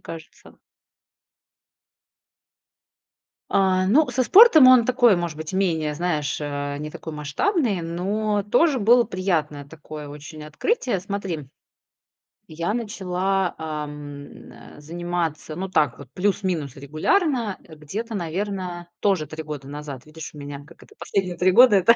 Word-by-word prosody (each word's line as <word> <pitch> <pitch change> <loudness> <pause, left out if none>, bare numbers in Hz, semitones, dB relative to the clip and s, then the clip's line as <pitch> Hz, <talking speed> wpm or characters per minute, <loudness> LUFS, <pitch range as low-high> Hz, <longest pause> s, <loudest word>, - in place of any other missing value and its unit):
кажется. 165 0 -11 3.0
А, 185 -1 +3
ну, 290 +11 +4
со 260 - +1
спортом 320 - +8
он 255 -3 +7
такой, 245 -5 +4
может 170 -3 -3
быть, 155 +3 -6
менее, 165 -6 0
знаешь, 155 -4 -1
э, 145 -1 -3
не 150 +1 -5
такой 160 +1 -8
масштабный, 190 - 0
но 205 +5 -1
тоже 265 - +3
было 235 +3 +5
приятное 170 -8 -2
такое 150 0 -10
очень 150 +2 -10
открытие. 235 - -1
Смотри, 185 -7 -5 1.0
я 170 +6 -3
начала, 195 -4 -1
ам, 150 -2 -4 0.6
н, - - -13 0.3
э, - - -13
заниматься, 170 -1 -3
ну, 190 +3 -4
так 150 -6 +1
вот, 140 - -11
плюс-минус 180 -7 -1
регулярно, 220 - 0
э, 160 - -14
где-то, 210 +10 -6
наверно, 180 0 -4
тоже 190 -7 +1
3 160 0 -7
года 150 -3 -7
назад. 145 -1 -8
Видишь, 160 +1 -9
у 150 - -11
меня, 145 0 -8
как - - -18
это, - - -18
последние 185 -3 -2
3 185 +1 +3
года- 245 +1 +7
это 200 +5 +6
175 Hz, 135 wpm, -23 LUFS, 150-205 Hz, 3.0 s, спортом